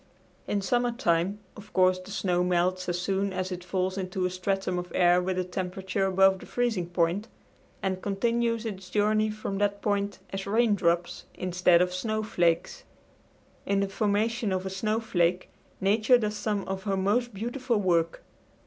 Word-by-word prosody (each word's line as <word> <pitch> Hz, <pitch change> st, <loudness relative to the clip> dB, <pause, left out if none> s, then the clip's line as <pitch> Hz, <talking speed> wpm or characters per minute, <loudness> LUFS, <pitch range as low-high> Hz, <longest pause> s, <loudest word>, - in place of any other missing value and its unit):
In 200 Hz, -1 st, -1 dB
summer 240 Hz, +5 st, +1 dB
time 195 Hz, -5 st, +1 dB, 0.2 s
of 210 Hz, 0 st, -13 dB
course 185 Hz, 0 st, +4 dB
the 185 Hz, -, -12 dB
snow 180 Hz, -3 st, 0 dB
melts 180 Hz, +1 st, +1 dB
as 175 Hz, 0 st, -1 dB
soon 195 Hz, +2 st, 0 dB
as 185 Hz, 0 st, -3 dB
it 180 Hz, -1 st, -5 dB
falls 185 Hz, +1 st, -1 dB
into 185 Hz, 0 st, -2 dB
a 180 Hz, -, -1 dB
stratum 185 Hz, 0 st, -1 dB
of 180 Hz, 0 st, -7 dB
air 180 Hz, 0 st, +5 dB
with 185 Hz, 0 st, -2 dB
a 185 Hz, -, +1 dB
temperature 190 Hz, +1 st, -2 dB
above 190 Hz, 0 st, +4 dB
the -, -, -12 dB
freezing 220 Hz, -8 st, -1 dB
point, 175 Hz, +4 st, 0 dB, 0.6 s
and 190 Hz, -1 st, -1 dB
continues 230 Hz, +3 st, 0 dB
its 190 Hz, -4 st, -6 dB
journey 215 Hz, +2 st, +2 dB
from 210 Hz, -2 st, -4 dB
that 205 Hz, 0 st, +1 dB
point 200 Hz, -1 st, -1 dB, 0.2 s
as 195 Hz, 0 st, -4 dB
raindrops 200 Hz, -6 st, +1 dB
instead 180 Hz, -1 st, +3 dB
of 180 Hz, 0 st, -3 dB
snowflakes. 185 Hz, -, 0 dB, 0.8 s
In 200 Hz, 0 st, +2 dB
the 200 Hz, -, +1 dB
formation 215 Hz, +2 st, 0 dB
of 185 Hz, 0 st, -1 dB
a 190 Hz, -, -3 dB
snowflake 190 Hz, -3 st, 0 dB, 0.3 s
Nature 215 Hz, +5 st, +4 dB
does 215 Hz, -2 st, -2 dB
some 210 Hz, -1 st, -1 dB
of 190 Hz, 0 st, -4 dB
her 195 Hz, -2 st, 0 dB
most 215 Hz, +6 st, +1 dB
beautiful 240 Hz, +3 st, -2 dB
work. 170 Hz, -4 st, +1 dB
195 Hz, 165 wpm, -27 LUFS, 180-215 Hz, 0.8 s, air